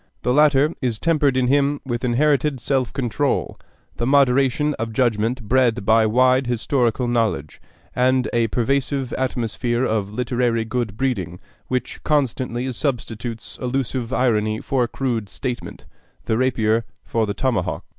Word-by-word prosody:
The 125 Hz, -, +1 dB
latter 150 Hz, +1 st, +4 dB
is 120 Hz, -4 st, -1 dB
tempered 145 Hz, -3 st, +2 dB
in 130 Hz, -, +2 dB
him 140 Hz, +2 st, +2 dB
with 120 Hz, -2 st, -3 dB
inherited 140 Hz, +2 st, +2 dB
self 130 Hz, 0 st, 0 dB
control, 135 Hz, +1 st, -1 dB, 0.4 s
the 120 Hz, -, -1 dB
moderation 140 Hz, +1 st, +3 dB
of 115 Hz, -1 st, -3 dB
judgment 115 Hz, +1 st, 0 dB
bred 120 Hz, -1 st, +2 dB
by 110 Hz, +1 st, +4 dB
wide 130 Hz, +3 st, +3 dB
historical 120 Hz, 0 st, 0 dB
knowledge, 110 Hz, -11 st, -1 dB, 0.3 s
and 130 Hz, 0 st, +2 dB
a 115 Hz, -1 st, +2 dB
pervasive 135 Hz, +3 st, -1 dB
atmosphere 120 Hz, -1 st, -1 dB
of 105 Hz, -4 st, -1 dB
literary 120 Hz, 0 st, 0 dB
good 115 Hz, -3 st, -3 dB
breeding 95 Hz, -10 st, -2 dB, 0.3 s
which 125 Hz, -1 st, -3 dB
constantly 130 Hz, -3 st, 0 dB
substitutes 115 Hz, -3 st, -4 dB
allusive 125 Hz, -1 st, -2 dB
irony 110 Hz, -4 st, +1 dB
for 125 Hz, -3 st, 0 dB
crude 115 Hz, -6 st, -2 dB
statement, 125 Hz, +4 st, -6 dB, 0.4 s
the 110 Hz, -, 0 dB
rapier 115 Hz, -2 st, +1 dB, 0.2 s
for 115 Hz, -2 st, -1 dB
the 100 Hz, -, -3 dB
tomahawk. 130 Hz, -4 st, -1 dB
125 Hz, 135 wpm, -21 LUFS, 115-135 Hz, 0.4 s, latter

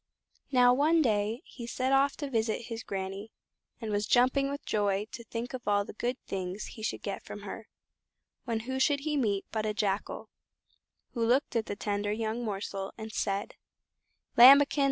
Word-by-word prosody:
Now 245 Hz, -2 st, +6 dB
one 310 Hz, +5 st, +3 dB
day 215 Hz, 0 st, 0 dB
he 235 Hz, -2 st, -9 dB
set 260 Hz, +2 st, 0 dB
off 275 Hz, +1 st, +3 dB
to 290 Hz, -2 st, -4 dB
visit 225 Hz, -1 st, 0 dB
his 230 Hz, -1 st, -5 dB
Granny, 195 Hz, +1 st, -5 dB, 0.5 s
and 220 Hz, -2 st, -4 dB
was 205 Hz, 0 st, 0 dB
jumping 260 Hz, +3 st, +3 dB
with 285 Hz, +1 st, -6 dB
joy 205 Hz, -1 st, 0 dB
to 235 Hz, -, -8 dB
think 235 Hz, +2 st, -5 dB
of 255 Hz, -2 st, -7 dB
all 205 Hz, -1 st, +2 dB
the -, -, -9 dB
good 240 Hz, +4 st, -2 dB
things 190 Hz, +1 st, -4 dB
he 220 Hz, -, -10 dB
should 215 Hz, -, -3 dB
get 200 Hz, -, -4 dB
from 205 Hz, -, -8 dB
her, 210 Hz, +2 st, -7 dB, 0.8 s
when 230 Hz, -3 st, -1 dB
who 260 Hz, +3 st, -3 dB
should 280 Hz, +1 st, +2 dB
he 300 Hz, +1 st, -1 dB
meet 205 Hz, -8 st, 0 dB
but 220 Hz, -1 st, -1 dB
a 215 Hz, -1 st, -2 dB
Jackal, 200 Hz, -1 st, -2 dB, 0.8 s
who 235 Hz, -, -1 dB
looked 245 Hz, +3 st, +2 dB
at 225 Hz, -1 st, 0 dB
the -, -, -3 dB
tender 205 Hz, 0 st, -2 dB
young 225 Hz, +2 st, -2 dB
morsel 195 Hz, -2 st, -4 dB
and 220 Hz, -1 st, -7 dB
said: 200 Hz, 0 st, -2 dB, 0.8 s
"Lambikin! 275 Hz, +4 st, +8 dB
225 Hz, 180 wpm, -30 LUFS, 205-255 Hz, 0.8 s, Lambikin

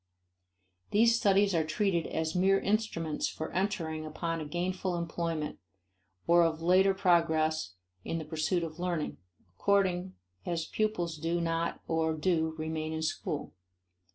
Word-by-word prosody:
These 230 Hz, +2 st, +5 dB
studies 200 Hz, -3 st, +3 dB
are 165 Hz, -2 st, +2 dB
treated 170 Hz, +2 st, 0 dB
as 160 Hz, 0 st, -2 dB
mere 195 Hz, +2 st, +4 dB
instruments 200 Hz, -7 st, -1 dB
for 160 Hz, -, -5 dB
entering 175 Hz, -5 st, -1 dB
upon 165 Hz, +1 st, -3 dB
a -, -, -4 dB
gainful 180 Hz, +2 st, -2 dB
employment 165 Hz, -2 st, -3 dB, 0.7 s
or 170 Hz, 0 st, +6 dB
of 160 Hz, -1 st, +1 dB
later 185 Hz, +3 st, +4 dB
progress 160 Hz, -, +2 dB, 0.3 s
in 165 Hz, -, -2 dB
the 160 Hz, -, -5 dB
pursuit 160 Hz, +3 st, 0 dB
of 160 Hz, 0 st, -6 dB
learning, 175 Hz, -, -2 dB, 0.4 s
according 185 Hz, -, +1 dB, 0.3 s
as 165 Hz, -2 st, -2 dB
pupils 175 Hz, -5 st, -1 dB
do 165 Hz, +3 st, -1 dB
not 165 Hz, 0 st, -1 dB
or 160 Hz, -1 st, +1 dB
do 160 Hz, 0 st, +1 dB
remain 155 Hz, 0 st, -3 dB
in 160 Hz, 0 st, -3 dB
school. 160 Hz, -, -3 dB
170 Hz, 135 wpm, -30 LUFS, 160-185 Hz, 0.7 s, or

